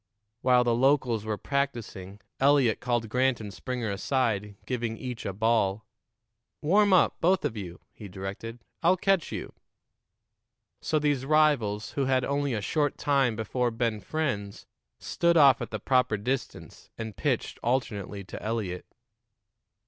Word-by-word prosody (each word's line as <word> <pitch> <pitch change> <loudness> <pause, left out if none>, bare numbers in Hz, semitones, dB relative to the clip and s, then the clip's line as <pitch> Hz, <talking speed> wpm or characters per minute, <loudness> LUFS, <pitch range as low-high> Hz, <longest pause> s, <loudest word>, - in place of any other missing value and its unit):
While 125 -1 +4
the 120 -1 +2
locals 125 -3 +2
were 110 -1 -2
practicing 115 -9 -3 0.2
Eliot 135 -4 +4
called 120 -2 -1
Grant 125 +2 +1
and 105 -2 -7
Springer 125 -3 -4
aside, 105 -2 -1
giving 120 -3 -3
each 125 -3 -6
a - - -1
ball. 110 0 +1 0.8
"Warm 200 +6 +4
up, 185 - +4
both 185 +2 +3
of 115 - -2
you," 90 -4 -7
he 105 - -10
directed. 100 +5 -7 0.2
"I'll 180 +3 +4
catch 195 -2 +1
you." - - -6 1.3
So 155 - 0
these 145 -3 +1
rivals, 135 -8 +2
who 140 - -1
had 130 -1 +2
only 140 -2 -1
a 105 - -2
short 145 +7 0
time 135 -5 +2
before 120 +3 -1
been 115 -2 -1
friends, 105 -8 -3 0.3
stood 170 0 +1
off 140 -4 +6
at - - -4
the - - -3
proper 125 -5 +2
distance 125 +6 -5
and 110 -3 -6
pitched - - -2
alternately 105 -5 -2
to 95 - -9
Eliot. 105 -5 -3
120 Hz, 145 wpm, -27 LUFS, 105-140 Hz, 1.3 s, off